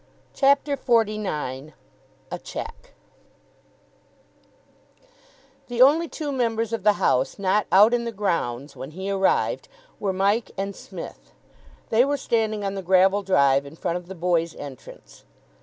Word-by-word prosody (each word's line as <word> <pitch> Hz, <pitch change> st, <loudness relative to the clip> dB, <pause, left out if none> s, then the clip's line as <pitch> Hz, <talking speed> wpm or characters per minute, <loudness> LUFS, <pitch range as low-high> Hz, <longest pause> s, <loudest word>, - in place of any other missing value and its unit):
CHAPTER 280 Hz, +1 st, +3 dB
XLIX 205 Hz, -, -1 dB, 0.6 s
A -, -, -4 dB
CHECK 460 Hz, +2 st, -8 dB, 2.7 s
The 245 Hz, -1 st, -5 dB
only 300 Hz, +6 st, +6 dB
two 300 Hz, -3 st, -5 dB
members 230 Hz, -3 st, -1 dB
of 225 Hz, -, -2 dB
the 210 Hz, +2 st, +4 dB
house 130 Hz, -8 st, +1 dB
not 200 Hz, +2 st, +1 dB
out 210 Hz, +5 st, +6 dB
in 240 Hz, -1 st, 0 dB
the 235 Hz, -, -3 dB
grounds 155 Hz, -, -2 dB
when 135 Hz, -, -7 dB
he 190 Hz, +1 st, -3 dB
arrived 195 Hz, -1 st, +1 dB, 0.3 s
were 200 Hz, -2 st, -1 dB
Mike 200 Hz, +4 st, +1 dB
and 195 Hz, 0 st, -3 dB
Psmith. -, -, -10 dB, 0.6 s
They 230 Hz, +2 st, +5 dB
were 285 Hz, +2 st, 0 dB
standing 220 Hz, -5 st, -1 dB
on 195 Hz, -, -2 dB
the 195 Hz, -, -4 dB
gravel 190 Hz, +2 st, +4 dB
drive 140 Hz, -8 st, +3 dB
in 140 Hz, +2 st, -11 dB
front 170 Hz, +1 st, -2 dB
of 175 Hz, -1 st, -10 dB
the 190 Hz, -, -8 dB
boys' 170 Hz, -1 st, 0 dB
entrance. 135 Hz, -3 st, -11 dB
200 Hz, 140 wpm, -24 LUFS, 175-230 Hz, 2.7 s, only